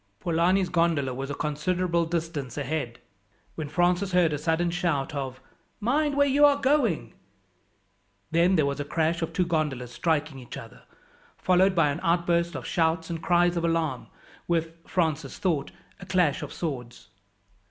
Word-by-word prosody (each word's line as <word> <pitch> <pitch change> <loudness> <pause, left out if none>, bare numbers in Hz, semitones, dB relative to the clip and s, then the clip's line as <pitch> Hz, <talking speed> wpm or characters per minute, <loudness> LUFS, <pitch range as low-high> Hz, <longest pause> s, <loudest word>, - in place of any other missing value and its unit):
Polani's 175 - +2
gondola 165 -7 +1
was 135 +2 -5
a 145 - -3
considerable 170 +3 0
distance 160 -6 -3
ahead, 140 -4 -3 0.6
when 155 -3 -5
Francis 180 +4 +1
heard 175 -4 +4
a - - -1
sudden 165 +3 0
shout 170 -5 -1
of, 135 -2 -4 0.4
"Mind 285 +6 +1
where 285 - +5
you 285 +1 +3
are 290 -1 +7
going!" 260 - +1 1.2
Then 170 +3 +4
there 155 -4 +3
was 140 0 -2
a - - -1
crash 160 +3 0
of 165 0 -2
two 180 +2 +1
gondolas 150 -7 -1
striking 150 +2 -1
each 125 - -9
other, - - -11 0.6
followed 185 +1 +3
by 160 -4 +3
an 140 - -4
outburst 170 0 +1
of - - -5
shouts 165 -1 0
and 165 -1 -4
cries 175 0 +3
of 170 - -1
alarm, 165 -6 -1 0.4
with, 165 -1 0
Francis 160 -5 -1
thought, 160 -7 0 0.3
the 180 - -11
clash 180 -6 +2
of - - -6
swords. 125 - -6
165 Hz, 160 wpm, -26 LUFS, 145-180 Hz, 1.2 s, are